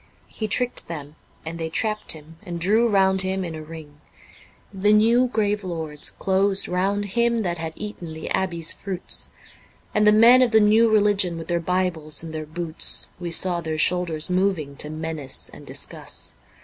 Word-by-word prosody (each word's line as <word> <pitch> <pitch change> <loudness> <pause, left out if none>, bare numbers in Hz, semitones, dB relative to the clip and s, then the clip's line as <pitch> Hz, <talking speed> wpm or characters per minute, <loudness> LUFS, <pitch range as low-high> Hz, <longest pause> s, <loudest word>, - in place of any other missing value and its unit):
He 215 - -5
tricked 245 +3 +1
them 150 -3 -8 0.3
and 165 +1 -6
they 160 0 -3
trapped 215 +5 +1
him 160 +1 -14
and 175 -5 -6
drew 215 +7 +2
round 190 -2 +6
him 190 0 -2
in 170 - -6
a 155 - -7
ring; 155 -2 -12 0.7
The 200 +2 +2
new 230 +4 +4
grave 210 -3 -1
lords 160 -5 -4
closed 195 +1 +1
round 195 +3 -1
him 235 -1 +1
that 175 -2 -3
had 160 0 -5
eaten 205 -6 -7
the 160 - -8
abbey's 170 -4 0
fruits, 190 -2 -3 0.6
And 210 0 +3
the - - +8
men 230 +4 +7
of 250 - +4
the 220 -1 +5
new 220 +2 +4
religion 205 -5 +2
with 165 -1 -8
their 170 0 +1
Bibles 170 -4 -2
in 165 - -7
their 155 -1 -6
boots, 165 0 -1
We 175 -1 -5
saw 175 +1 +2
their 160 -1 -4
shoulders 165 -1 +2
moving 180 -6 -1
to 150 - -4
menace 155 -3 -3
and - - -13
discuss. - - -3
180 Hz, 175 wpm, -23 LUFS, 160-210 Hz, 0.7 s, the